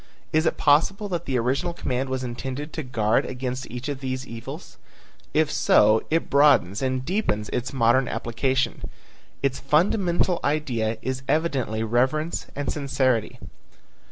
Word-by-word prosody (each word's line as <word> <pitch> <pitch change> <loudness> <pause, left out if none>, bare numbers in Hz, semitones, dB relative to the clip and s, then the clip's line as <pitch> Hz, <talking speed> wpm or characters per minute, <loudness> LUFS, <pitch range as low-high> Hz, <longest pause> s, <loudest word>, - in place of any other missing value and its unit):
Is 155 +1 +3
it - - 0
possible 180 +8 +3
that 175 -2 -3
the 130 -2 0
original 135 +9 0
command 130 -4 -2
was 130 0 -2
intended 130 +4 -5
to 160 - -3
guard 115 -5 +1
against 130 0 -4
each 125 +3 -6
of 145 -2 -3
these 130 -1 -4
evils? 115 -2 -9 0.5
If 155 -1 +2
so, 110 +1 +4
it 165 +1 +1
broadens 140 -9 +4
and 130 -1 -1
deepens 130 - -1
its 125 +2 -2
modern 130 0 +3
application. 130 +3 -1 0.6
Its 135 -1 0
fundamental 175 +4 +2
idea 120 -7 0
is 130 0 -2
evidently 135 -9 0
reverence 130 +8 0
and 145 0 -2
sincerity. 130 -5 0
130 Hz, 140 wpm, -24 LUFS, 120-150 Hz, 0.6 s, so